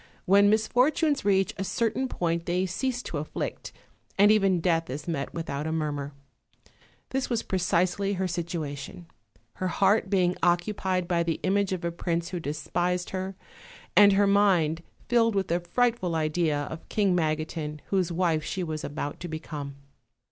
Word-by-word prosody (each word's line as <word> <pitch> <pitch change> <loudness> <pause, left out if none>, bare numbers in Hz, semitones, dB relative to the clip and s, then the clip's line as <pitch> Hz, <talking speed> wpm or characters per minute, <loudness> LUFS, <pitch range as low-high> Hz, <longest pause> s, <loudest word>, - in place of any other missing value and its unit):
When 200 +2 +6
misfortunes 255 +7 +2
reach 195 -1 +2
a 195 - -2
certain 230 +6 0
point 170 -6 -2
they 180 +2 +1
cease 245 +7 -2
to 150 - -4
afflict, 150 - -5 0.5
and 205 +2 +6
even 195 -4 +3
death 165 -1 +1
is 145 +5 -6
met 145 -5 -2
without 155 -3 -4
a - - -2
murmur: 145 -3 -2 1.0
this 265 0 -1
was 235 -3 0
precisely 185 +2 +1
her 190 -1 -1
situation, 170 -3 -5 0.5
her 185 - -1
heart 195 +3 +2
being 180 -2 +2
occupied 180 +1 +1
by 175 -1 +1
the 170 -1 -1
image 200 +1 +1
of 180 -2 -3
a 170 - 0
prince 170 0 -2
who 180 - -4
despised 175 +4 -2
her, 190 0 -4 0.6
and 205 -1 +8
her 200 +1 +4
mind 185 -6 +3 0.3
filled 230 -2 +3
with 195 -2 0
the 170 +1 +1
frightful 185 0 0
idea 155 -1 0
of 160 +3 -8
King 200 -4 +2
Magotiu, 155 -1 -2
whose 185 -3 +1
wife 170 -3 +1
she 185 +4 -3
was 155 -2 -4
about 145 0 -4
to 175 - -6
become. 155 -3 -6
180 Hz, 160 wpm, -27 LUFS, 160-195 Hz, 1.0 s, and